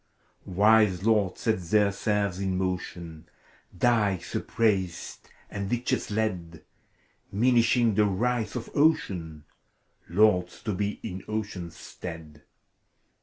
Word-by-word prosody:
Wise 105 Hz, -1 st, +4 dB
lords 105 Hz, -4 st, +2 dB
set 110 Hz, -5 st, 0 dB
their 100 Hz, +4 st, +2 dB
serfs 100 Hz, -2 st, -1 dB
in 95 Hz, -1 st, -1 dB
motion. 85 Hz, -3 st, -4 dB, 0.5 s
Dikes 105 Hz, -5 st, +1 dB
upraised 95 Hz, -6 st, -1 dB, 0.2 s
and 100 Hz, -1 st, -5 dB
ditches 125 Hz, +2 st, -1 dB
led, 90 Hz, -7 st, -3 dB, 0.7 s
Minishing 120 Hz, +1 st, +3 dB
the 105 Hz, +1 st, +3 dB
rights 110 Hz, +2 st, -1 dB
of 120 Hz, -, -5 dB
Ocean, 95 Hz, -, +1 dB, 0.7 s
Lords 90 Hz, -1 st, +2 dB
to 105 Hz, -, -2 dB
be 100 Hz, +2 st, -2 dB
in 90 Hz, +1 st, -5 dB
Oceaa's 105 Hz, -6 st, -4 dB
stead. 80 Hz, -3 st, -9 dB
100 Hz, 105 wpm, -27 LUFS, 90-110 Hz, 0.7 s, Wise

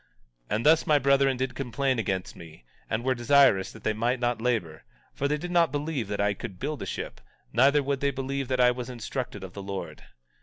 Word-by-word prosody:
17:18 -, -, +1 dB
And 110 Hz, -, -2 dB
thus 160 Hz, +2 st, +5 dB
my 150 Hz, -, +5 dB
brethren 140 Hz, -1 st, +3 dB
did 130 Hz, 0 st, -2 dB
complain 135 Hz, 0 st, -1 dB
against 95 Hz, -4 st, -2 dB
me, 80 Hz, -7 st, -13 dB, 0.2 s
and 110 Hz, +2 st, -1 dB
were 130 Hz, 0 st, +2 dB
desirous 120 Hz, -5 st, +4 dB
that 110 Hz, -, -14 dB
they 110 Hz, -, +1 dB
might 120 Hz, +4 st, 0 dB
not 120 Hz, -2 st, 0 dB
labor, 105 Hz, -11 st, -1 dB, 0.3 s
for 140 Hz, -, -1 dB
they 150 Hz, +1 st, 0 dB
did 175 Hz, +4 st, -6 dB
not 170 Hz, -4 st, +3 dB
believe 145 Hz, -4 st, -2 dB
that 100 Hz, 0 st, -3 dB
I 100 Hz, 0 st, +2 dB
could 95 Hz, -1 st, -8 dB
build 145 Hz, +4 st, -4 dB
a -, -, -4 dB
ship; -, -, -5 dB, 0.3 s
neither 140 Hz, +4 st, +4 dB
would 140 Hz, 0 st, -1 dB
they 140 Hz, -, +1 dB
believe 135 Hz, 0 st, -3 dB
that 130 Hz, 0 st, -1 dB
I 125 Hz, 0 st, +6 dB
was 125 Hz, 0 st, -5 dB
instructed 120 Hz, -3 st, -5 dB
of 95 Hz, -1 st, -8 dB
the 100 Hz, -, -7 dB
Lord. 95 Hz, -5 st, -6 dB
125 Hz, 225 wpm, -27 LUFS, 105-140 Hz, 0.3 s, I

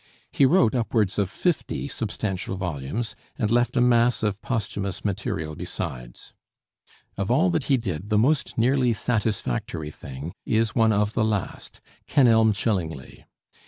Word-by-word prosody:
He 140 Hz, -, +4 dB
wrote 130 Hz, -8 st, +4 dB
upwards 110 Hz, -5 st, 0 dB
of 100 Hz, -2 st, +1 dB
fifty 170 Hz, -, -1 dB
substantial 100 Hz, -6 st, -3 dB
volumes, 90 Hz, -, -3 dB, 0.2 s
and 105 Hz, -2 st, 0 dB
left 120 Hz, +1 st, +2 dB
a -, -, +4 dB
mass 120 Hz, -1 st, +3 dB
of 105 Hz, -1 st, -1 dB
posthumous 100 Hz, -6 st, -3 dB
material 90 Hz, -6 st, -2 dB
besides. -, -, -6 dB, 0.8 s
Of 100 Hz, 0 st, -2 dB
all 160 Hz, +9 st, +3 dB
that 160 Hz, -6 st, -1 dB
he 135 Hz, -, +3 dB
did, 100 Hz, -4 st, -4 dB
the 105 Hz, -, +2 dB
most 140 Hz, +7 st, +1 dB
nearly 125 Hz, +1 st, +3 dB
satisfactory 100 Hz, -, -2 dB
thing 70 Hz, +4 st, -8 dB
is 110 Hz, 0 st, +1 dB
one 115 Hz, -2 st, +4 dB
of 105 Hz, 0 st, +1 dB
the 110 Hz, -, +1 dB
last, 105 Hz, -3 st, -3 dB, 0.3 s
'Kenelm 115 Hz, -5 st, +5 dB
Chillingly.' 90 Hz, -, -3 dB
110 Hz, 140 wpm, -25 LUFS, 95-120 Hz, 0.8 s, Kenelm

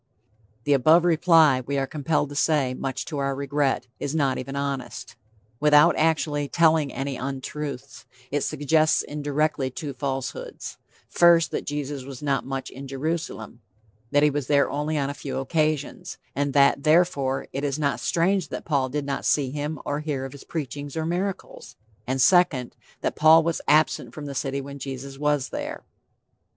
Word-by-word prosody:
The 145 Hz, -, +2 dB
above 155 Hz, +6 st, +5 dB
reply, 160 Hz, -5 st, +5 dB
we 140 Hz, +3 st, -2 dB
are 135 Hz, -, +1 dB
compelled 150 Hz, 0 st, -1 dB
to 145 Hz, -, -8 dB
say, 140 Hz, -4 st, +2 dB
much 135 Hz, 0 st, -4 dB
to 150 Hz, -4 st, -4 dB
our 140 Hz, 0 st, -1 dB
regret, 140 Hz, -2 st, 0 dB
is 145 Hz, +2 st, -3 dB
not 140 Hz, -4 st, +1 dB
even 135 Hz, +2 st, -6 dB
honest. 140 Hz, -2 st, -4 dB, 0.4 s
Without 150 Hz, +2 st, +5 dB
actually 150 Hz, -2 st, +1 dB
telling 160 Hz, -3 st, +3 dB
any 135 Hz, 0 st, -4 dB
untruths, 135 Hz, -1 st, -6 dB, 0.2 s
it 145 Hz, 0 st, 0 dB
suggests 155 Hz, +3 st, +2 dB
indirectly 145 Hz, -1 st, -1 dB
two 140 Hz, +2 st, -6 dB
falsehoods: 135 Hz, 0 st, -5 dB, 0.3 s
First, 170 Hz, -1 st, +4 dB
that -, -, -4 dB
Jesus 145 Hz, -2 st, -4 dB
was 135 Hz, 0 st, -9 dB
not 135 Hz, -2 st, 0 dB
much 135 Hz, -1 st, -4 dB
in 135 Hz, +1 st, -9 dB
Jerusalem 135 Hz, -5 st, -4 dB, 0.5 s
that 145 Hz, +2 st, +3 dB
he 150 Hz, -, +4 dB
was 145 Hz, -2 st, -3 dB
there 140 Hz, -1 st, +3 dB
only 150 Hz, +2 st, -1 dB
on 140 Hz, -1 st, -1 dB
a -, -, -6 dB
few 140 Hz, -1 st, -6 dB
occasions; 155 Hz, +1 st, -1 dB, 0.2 s
and 140 Hz, 0 st, -1 dB
that, 140 Hz, -1 st, +4 dB
therefore, 155 Hz, -4 st, +2 dB
it 135 Hz, -, -3 dB
is 140 Hz, -1 st, -1 dB
not 140 Hz, -2 st, 0 dB
strange 180 Hz, 0 st, +1 dB
that -, -, -6 dB
Paul 140 Hz, -4 st, 0 dB
did 145 Hz, +2 st, -3 dB
not 140 Hz, -1 st, -3 dB
see 135 Hz, -3 st, +1 dB
him 150 Hz, +2 st, -3 dB
or 145 Hz, 0 st, -2 dB
hear 145 Hz, -3 st, -3 dB
of 135 Hz, -, -7 dB
his 140 Hz, -, -12 dB
preaching 145 Hz, -2 st, -5 dB
or 160 Hz, -1 st, -2 dB
miracles; 180 Hz, -7 st, -4 dB, 0.3 s
and 130 Hz, +1 st, -1 dB
second, 155 Hz, -5 st, +3 dB, 0.3 s
that -, -, -1 dB
Paul 160 Hz, +1 st, +6 dB
was 165 Hz, 0 st, -1 dB
absent 155 Hz, +1 st, +2 dB
from 150 Hz, -, -7 dB
the 140 Hz, -, -5 dB
city 135 Hz, 0 st, -2 dB
when 140 Hz, +1 st, -9 dB
Jesus 135 Hz, 0 st, -7 dB
was 145 Hz, -2 st, 0 dB
there. -, -, -5 dB
145 Hz, 170 wpm, -25 LUFS, 135-155 Hz, 0.5 s, Paul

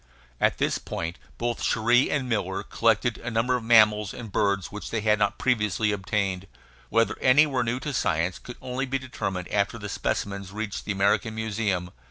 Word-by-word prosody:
At -, -, +2 dB
this -, -, 0 dB
point 85 Hz, +1 st, -5 dB, 0.2 s
both 120 Hz, 0 st, -2 dB
Cherrie 120 Hz, +4 st, +3 dB
and 140 Hz, -3 st, -1 dB
Miller 100 Hz, -4 st, -1 dB
collected 115 Hz, +2 st, +1 dB
a 120 Hz, -, -5 dB
number 120 Hz, +2 st, +1 dB
of 125 Hz, -, -3 dB
mammals 105 Hz, -3 st, +4 dB
and 115 Hz, -4 st, -8 dB
birds 100 Hz, -1 st, 0 dB
which 105 Hz, 0 st, -7 dB
they 110 Hz, -, -1 dB
had 105 Hz, 0 st, +2 dB
not 100 Hz, -1 st, +1 dB
previously 110 Hz, -3 st, +1 dB
obtained; 95 Hz, -1 st, -2 dB, 0.4 s
whether 115 Hz, +1 st, +2 dB
any 135 Hz, +4 st, +6 dB
were 135 Hz, -4 st, 0 dB
new 120 Hz, +2 st, -1 dB
to 150 Hz, 0 st, -4 dB
science 90 Hz, -5 st, 0 dB
could 125 Hz, -, -10 dB
only 130 Hz, +2 st, -3 dB
be 135 Hz, +1 st, 0 dB
determined 110 Hz, -9 st, -4 dB
after 100 Hz, +2 st, 0 dB
the 105 Hz, -2 st, -6 dB
specimens 100 Hz, +1 st, -3 dB
reached 105 Hz, 0 st, -5 dB
the -, -, -2 dB
American 100 Hz, +3 st, +1 dB
Museum. 105 Hz, -5 st, -2 dB
110 Hz, 185 wpm, -26 LUFS, 100-120 Hz, 0.4 s, any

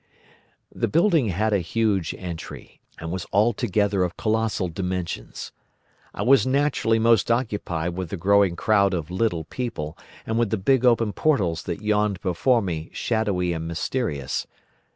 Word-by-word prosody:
"The -, -, -1 dB
building 165 Hz, -, +3 dB
had 105 Hz, +3 st, 0 dB
a 100 Hz, -, +3 dB
huge 95 Hz, -1 st, 0 dB
entry, 85 Hz, -3 st, -8 dB, 0.2 s
and 80 Hz, 0 st, -6 dB
was 95 Hz, -1 st, -4 dB
altogether 105 Hz, -2 st, +2 dB
of 90 Hz, -1 st, -3 dB
colossal 110 Hz, -3 st, 0 dB
dimensions. 90 Hz, -6 st, -4 dB, 0.6 s
I -, -, -4 dB
was 135 Hz, +1 st, +5 dB
naturally 135 Hz, -4 st, +2 dB
most 115 Hz, 0 st, +3 dB
occupied 105 Hz, -8 st, -1 dB
with 90 Hz, -2 st, -4 dB
the 100 Hz, -, -4 dB
growing 100 Hz, 0 st, +3 dB
crowd 100 Hz, 0 st, +2 dB
of 85 Hz, -1 st, -4 dB
little 90 Hz, -4 st, 0 dB
people, 85 Hz, -6 st, -5 dB, 0.3 s
and 115 Hz, +1 st, -1 dB
with 120 Hz, -3 st, +1 dB
the 110 Hz, -, 0 dB
big 130 Hz, +6 st, +2 dB
open 115 Hz, -3 st, +3 dB
portals 95 Hz, -, +1 dB
that 85 Hz, +2 st, -4 dB
yawned 105 Hz, -2 st, +1 dB
before 110 Hz, +6 st, +2 dB
me 80 Hz, -4 st, -4 dB
shadowy 100 Hz, -6 st, 0 dB
and 80 Hz, 0 st, -4 dB
mysterious. 80 Hz, -, -2 dB
100 Hz, 150 wpm, -24 LUFS, 85-115 Hz, 0.6 s, was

